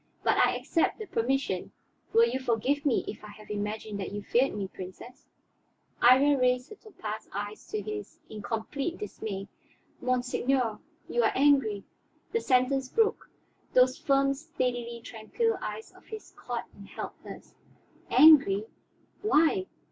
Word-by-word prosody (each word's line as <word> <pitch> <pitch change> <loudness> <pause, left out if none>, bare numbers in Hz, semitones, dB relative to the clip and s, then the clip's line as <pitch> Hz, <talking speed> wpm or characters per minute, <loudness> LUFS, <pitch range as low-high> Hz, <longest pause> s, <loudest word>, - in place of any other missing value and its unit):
"But - - +3
I - - +4
accept 330 - 0
the 435 - -6
permission. 250 - -1 0.4
Will 460 +1 +5
you 265 - -2
forgive 260 +4 0
me 260 - +1
if 210 - -7
I - - -8
have 210 0 -12
imagined 210 0 -4
that 195 - -4
you 205 0 -5
feared 255 +6 +2
me, 200 -2 -3
Princess?" 190 +7 -11 0.7
Iría 265 +3 +6
raised 250 0 +2
her - - -8
topaz 220 - -8
eyes 205 +1 -6
to 425 0 -3
his 420 -1 -6
in 215 -1 -8
complete 275 - -3
dismay. 205 - -6 0.5
"Monseigneur, 250 -1 0 0.3
you 240 - +1
are 225 - +3
angry 265 -8 +3 0.2
" - - -39
The 460 - +1
sentence 260 +1 +2
broke; 450 - +1 0.4
those 255 0 +5
firm, 275 -1 +2
steadily 250 -6 -3
tranquil 345 - -2
eyes 445 - -6
of - - -20
his 435 -1 -9
caught - - -5
and - - -13
held - - -6
hers. - - -11 0.6
"Angry? 270 -10 +7 0.6
Why? 375 0 +3
255 Hz, 150 wpm, -28 LUFS, 220-290 Hz, 0.7 s, Angry